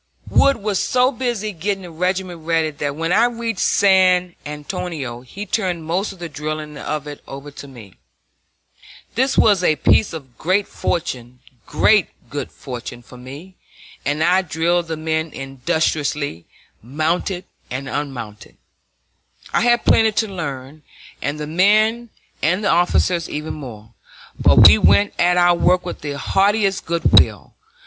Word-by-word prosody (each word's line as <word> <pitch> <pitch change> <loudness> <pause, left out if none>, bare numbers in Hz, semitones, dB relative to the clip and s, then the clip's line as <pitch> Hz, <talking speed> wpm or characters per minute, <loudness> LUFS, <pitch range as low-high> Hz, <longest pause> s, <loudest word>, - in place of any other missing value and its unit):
Wood 275 0 +3
was 205 -3 -2
so 255 +1 +2
busy 240 -5 -3
getting 195 +2 -3
the 175 - -9
regiment 180 +1 -2
ready 160 -1 0
that 145 -1 -4
when 165 +3 -1
I 230 +3 +5
reached 230 -3 -3
San 185 -2 +3
Antonio 150 -5 -5
he 195 +11 -8
turned 185 -5 -2
most 180 +6 -1
of 195 - -13
the 170 -1 -6
drilling 150 0 -5
of 150 +1 -4
it 145 -1 -9
over 140 +2 -9
to 140 - -11
me. 115 -8 -13 1.2
This 260 +3 0
was 200 -4 +4
a 155 - +3
piece 205 - +3
of 135 -7 -10
great 190 +4 +1
good 125 - -2
fortune 120 -1 -8
for 125 - -15
me, 145 +9 -11 0.5
and 145 +2 0
I 185 +3 +4
drilled 170 0 0
the 160 -1 -4
men 160 0 -2
industriously, 140 - -2 0.4
mounted 160 - -2 0.2
and 130 +2 -5
unmounted. 115 - -6 1.0
I - - +2
had 240 0 +2
plenty 220 -1 +4
to 220 - 0
learn, 145 -6 -6 0.4
and 145 +2 -3
the 150 - -4
men 215 +8 +2 0.3
and 180 +6 +1
the 200 - +2
officers 175 0 +1
even 150 +1 -4
more; 115 -7 -10 0.5
but - - +8
we 75 - +6
went 205 - +4
at 180 0 +3
our 175 0 +5
work 180 +1 +2
with 175 - -6
the 145 -1 -4
heartiest 195 +4 +1
good 170 0 +5
will. - - -1
165 Hz, 145 wpm, -20 LUFS, 145-190 Hz, 1.2 s, but